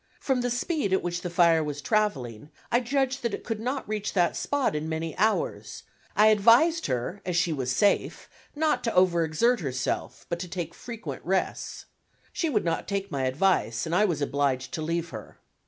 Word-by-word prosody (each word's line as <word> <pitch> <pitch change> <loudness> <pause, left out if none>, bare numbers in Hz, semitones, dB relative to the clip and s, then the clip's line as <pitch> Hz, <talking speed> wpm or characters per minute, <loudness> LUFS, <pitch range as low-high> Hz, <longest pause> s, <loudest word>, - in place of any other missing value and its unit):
From 265 -3 0
the 245 - 0
speed 245 - -1
at 190 - +2
which 175 0 -2
the 180 - -4
fire 170 -2 +4
was 145 -1 -4
traveling 145 - -1 0.2
I 240 - +4
judged 265 +1 0
that 235 -3 -1
it - - -11
could 225 -2 -3
not 255 +4 -3
reach 210 -1 -3
that 175 -3 +2
spot 285 - 0
in 155 +1 -3
many 160 0 -3
hours, 220 - -1 0.3
I 215 +1 +6
advised 235 +11 +5
her, 130 +9 -3
as 180 -1 -2
she 175 -2 +2
was 130 -3 -2
safe, 200 +7 +1 0.3
not 310 0 +1
to 230 - -1
over 180 -2 +4
exert 220 +10 +2
herself, 130 -6 -3
but 170 - -3
to 180 - -5
take 170 -2 -5
frequent 230 -2 -7
rests. 190 +2 -2 0.5
She 330 - 0
would 210 -10 0
not 165 -1 -1
take 200 -1 -3
my 135 -3 -1
advice 130 - +1
and 160 - -3
I 205 +4 +4
was 160 -7 -1
obliged 140 0 -1
to 165 - -3
leave 165 +1 -2
her. 110 -3 -10
180 Hz, 195 wpm, -27 LUFS, 155-230 Hz, 0.5 s, I